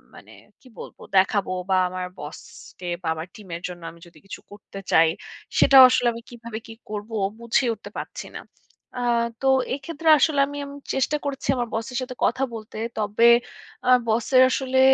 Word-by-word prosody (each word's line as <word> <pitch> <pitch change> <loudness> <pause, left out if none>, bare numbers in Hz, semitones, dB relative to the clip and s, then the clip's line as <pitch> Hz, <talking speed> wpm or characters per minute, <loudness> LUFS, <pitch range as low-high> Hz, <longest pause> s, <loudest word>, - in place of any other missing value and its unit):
মানে - - -15 0.3
কি 260 - -19
বলবো? - - -10 0.2
দেখাবো 195 0 +2 0.2
বা 190 - +3
আমার 185 0 -4
বসকে 150 +4 -11 0.2
বা - - -4
আমার 160 +2 -6
টিম 210 -3 -13
এর 170 - -7
জন্য 175 -1 -9
আমি 170 - -18
যদি 170 - -19
কিছু 195 - -8
করতে 205 -1 -11
চাই, 160 0 +5 0.5
সেটাও 270 -1 +9
আসলে 250 -1 +2
আমি 230 - -8
কিভাবে 235 -2 -8
কি 225 - -9 0.2
করব 210 +1 -6 0.3
বুঝে 235 +2 +1
উঠতে 215 - -11
পাচ্ছি - - -7
না। - - -8 0.6
আ - - -2 0.4
তো 270 - 0 0.3
এক্ষেত্রে 320 +3 -3
আসলে 300 0 +2
আমি 285 0 -7
আম 280 - -9 0.2
চেষ্টা 270 +3 0
করছি 280 -1 -4
আমার 245 -1 -2
বসের 230 +2 -4
সাথে 255 0 -6
কথা 260 +3 0
বলতে। 215 -1 -9 0.2
তবে 210 +2 +1 0.6
আ - - +4 0.2
বসের 240 +4 +3
আসলে 260 0 0
230 Hz, 175 wpm, -23 LUFS, 200-260 Hz, 0.6 s, সেটাও